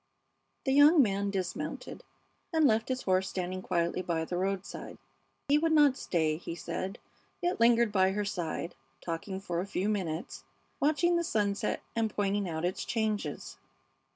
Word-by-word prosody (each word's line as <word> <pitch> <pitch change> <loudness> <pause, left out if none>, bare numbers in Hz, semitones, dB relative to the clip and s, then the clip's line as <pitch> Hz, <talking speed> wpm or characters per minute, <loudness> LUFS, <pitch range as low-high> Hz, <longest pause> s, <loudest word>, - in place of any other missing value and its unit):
The 265 - +2
young 295 +4 +7
man 200 -2 0
dismounted 190 -3 -4 0.5
and 320 -2 +3
left 220 -2 +3
his 260 0 -2
horse 185 0 +1
standing 185 0 -3
quietly 170 0 0
by 165 -2 -1
the 175 - -4
roadside. 190 +1 -3 0.5
He 290 +2 +4
would 325 0 +2
not 295 -4 +6
stay, 160 - 0
he 170 0 -6
said, 190 +5 -4 0.4
yet 350 -6 -1
lingered 235 -1 +5
by 190 -1 +3
her 205 +1 -1
side, 175 -3 -3 0.3
talking 175 +3 -4
for 175 -3 -3
a 190 - -5
few 195 0 -1
minutes, 185 -6 -3 0.4
watching 340 +4 +3
the 340 - +1
sunset 205 -9 -1
and 225 -1 +1
pointing 200 -2 -1
out 160 +1 -2
its 180 - -2
changes. 220 -3 -2
200 Hz, 155 wpm, -30 LUFS, 180-235 Hz, 0.5 s, young